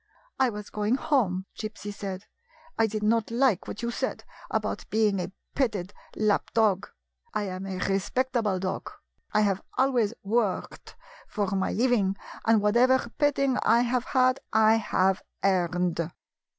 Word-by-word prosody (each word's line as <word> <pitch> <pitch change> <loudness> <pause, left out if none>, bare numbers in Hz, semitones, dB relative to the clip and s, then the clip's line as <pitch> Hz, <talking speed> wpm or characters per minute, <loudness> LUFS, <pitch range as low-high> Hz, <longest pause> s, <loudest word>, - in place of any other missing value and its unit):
" - - -36
I - - +2
was 210 -2 -7
going 210 +3 +1
home," 255 -11 +1
Gypsy 205 -1 -6
said. 195 -1 -6 0.3
" 325 -9 -28
I 225 - +5
did 215 0 -4
not 225 +1 +2
like 235 -4 +2
what 225 - -6
you 235 - -1
said - - -3 0.3
about - - -2
being 215 -3 +2
a 180 - -4 0.2
petted 210 -8 -1 0.2
lap 215 -2 +1
dog. 210 -4 +2 0.5
I 210 - +1
am 190 0 -5
a 190 -1 -4
respectable 210 +3 0
dog. 185 0 -3 0.4
I 215 - +3
have 195 -2 +1 0.2
always 245 -5 +2
worked 210 -1 -1 0.3
for 205 -3 -2
my 190 -1 0
living, 225 -5 +2 0.3
and 220 -2 +4
whatever 240 +3 +3
petting 275 -3 +2
I 230 +2 +4
have 245 0 0
had 255 0 +3
I 220 0 +5
have 190 -3 +1 0.2
earned. 180 -3 +1
215 Hz, 150 wpm, -27 LUFS, 195-240 Hz, 0.5 s, I